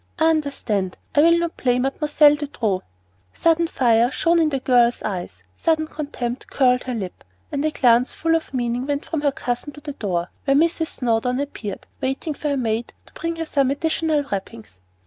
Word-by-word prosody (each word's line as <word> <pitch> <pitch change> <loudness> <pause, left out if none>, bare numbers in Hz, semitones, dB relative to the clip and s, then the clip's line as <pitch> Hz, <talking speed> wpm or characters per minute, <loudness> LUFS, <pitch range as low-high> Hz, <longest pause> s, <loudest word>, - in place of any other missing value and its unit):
I 320 0 +4
understand. 235 - -1 0.2
I 290 - +5
will 335 +2 +6
not 340 -1 -2
play 250 -1 +2
Mademoiselle 295 +3 +4
De 295 0 -3
Trop." 215 -9 -1 0.5
Sudden 335 0 +2
fire 235 -5 +3
shone 335 +6 +2
in 320 -2 +3
the 275 -2 -1
girl's 245 -2 +3
eyes, 175 - -5
sudden 315 - +1
contempt 275 -5 -5
curled 250 -2 +3
her 255 -1 -3
lip, 190 -5 -6 0.3
and 285 0 -1
a 310 - +2
glance 245 -3 +3
full 330 0 0
of 325 -1 -1
meaning 245 0 -1
went 285 0 -2
from 320 -3 -2
her 285 -1 +2
cousin 275 -1 -4
to 295 - -11
the 290 -1 -6
door, 180 -8 -2
where 275 0 +4
Mrs. 325 +1 +2
Snowdon 250 0 0
appeared, 235 -8 -5 0.2
waiting 270 +4 -2
for 295 +1 -3
her 280 - 0
maid 230 -1 -2
to - - -19
bring 335 0 -3
her 330 0 -3
some 275 -4 +1
additional 315 +1 0
wrappings. 200 - -6
275 Hz, 190 wpm, -22 LUFS, 240-310 Hz, 0.5 s, will